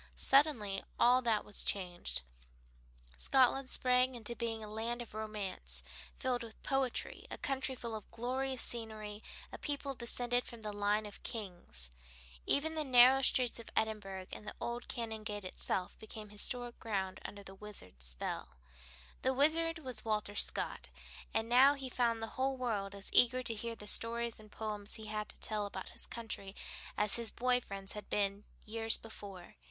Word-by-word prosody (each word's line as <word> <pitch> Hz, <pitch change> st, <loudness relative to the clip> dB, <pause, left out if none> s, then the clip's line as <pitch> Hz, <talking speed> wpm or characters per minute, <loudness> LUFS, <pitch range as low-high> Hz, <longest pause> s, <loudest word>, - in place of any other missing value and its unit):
Suddenly 240 Hz, -9 st, +4 dB, 0.2 s
all 250 Hz, +1 st, +6 dB
that 225 Hz, -4 st, +2 dB
was 210 Hz, -, -2 dB
changed: 175 Hz, -, 0 dB, 0.9 s
Scotland 265 Hz, 0 st, +4 dB
sprang 250 Hz, 0 st, +4 dB
into 235 Hz, 0 st, -3 dB
being 225 Hz, -2 st, -2 dB
as -, -, -6 dB
a -, -, -9 dB
land 230 Hz, +2 st, -2 dB
of 240 Hz, -3 st, -7 dB
romance, 200 Hz, -, -4 dB, 0.3 s
filled 250 Hz, -1 st, 0 dB
with 225 Hz, -2 st, -10 dB
poetry, 270 Hz, -2 st, -1 dB
a -, -, -5 dB
country 265 Hz, -1 st, -1 dB
full 235 Hz, -2 st, -5 dB
of 215 Hz, -1 st, -6 dB
glorious 260 Hz, +2 st, -1 dB
scenery, 215 Hz, -2 st, -3 dB, 0.3 s
a -, -, -7 dB
people 285 Hz, -1 st, -2 dB
descended 245 Hz, 0 st, +1 dB
from 230 Hz, -2 st, -9 dB
a 210 Hz, -, -1 dB
line 205 Hz, +1 st, +1 dB
of 205 Hz, -, -9 dB
kings. 175 Hz, -, -5 dB, 0.6 s
Even 315 Hz, +3 st, +3 dB
the 310 Hz, -1 st, -1 dB
narrow 260 Hz, 0 st, +8 dB
streets 250 Hz, -3 st, +2 dB
of 230 Hz, -, -8 dB
Edinburgh 205 Hz, -4 st, -1 dB
and 210 Hz, -, -7 dB
the -, -, -5 dB
old 240 Hz, +1 st, -3 dB
Canongate 220 Hz, -3 st, -3 dB
itself 185 Hz, +1 st, -2 dB
became 215 Hz, -1 st, -8 dB
historic 240 Hz, +3 st, 0 dB
ground 190 Hz, -4 st, -2 dB
under 205 Hz, 0 st, -7 dB
the 195 Hz, -, -9 dB
Wizard's 190 Hz, -, -8 dB
spell. -, -, -4 dB, 0.7 s
The 260 Hz, 0 st, +2 dB
Wizard 325 Hz, +4 st, +3 dB
was 255 Hz, -8 st, 0 dB
Walter 210 Hz, -2 st, 0 dB
Scott, -, -, +2 dB, 0.4 s
and 225 Hz, 0 st, 0 dB
now 260 Hz, +4 st, +7 dB
he 270 Hz, -2 st, -5 dB
found 235 Hz, -2 st, +1 dB
the 225 Hz, +3 st, -5 dB
whole 265 Hz, 0 st, +2 dB
world 205 Hz, -6 st, -1 dB
as 200 Hz, 0 st, -4 dB
eager 250 Hz, +1 st, +7 dB
to 235 Hz, -, +2 dB
hear 230 Hz, +1 st, -4 dB
the 210 Hz, -, -10 dB
stories 230 Hz, +2 st, +2 dB
and 215 Hz, -1 st, -14 dB
poems 210 Hz, -2 st, -2 dB
he 220 Hz, -, -6 dB
had 215 Hz, 0 st, -3 dB
to -, -, -5 dB
tell 210 Hz, -2 st, -1 dB
about 190 Hz, -2 st, -6 dB
his -, -, -3 dB
country 210 Hz, -4 st, -5 dB, 0.4 s
as 210 Hz, +1 st, +4 dB
his 235 Hz, -1 st, -1 dB
boy 250 Hz, 0 st, +2 dB
friends 195 Hz, -3 st, -5 dB
had 210 Hz, -, -8 dB
been 200 Hz, 0 st, 0 dB, 0.2 s
years 225 Hz, +1 st, 0 dB
before. 200 Hz, -5 st, -10 dB
225 Hz, 170 wpm, -35 LUFS, 205-250 Hz, 0.9 s, narrow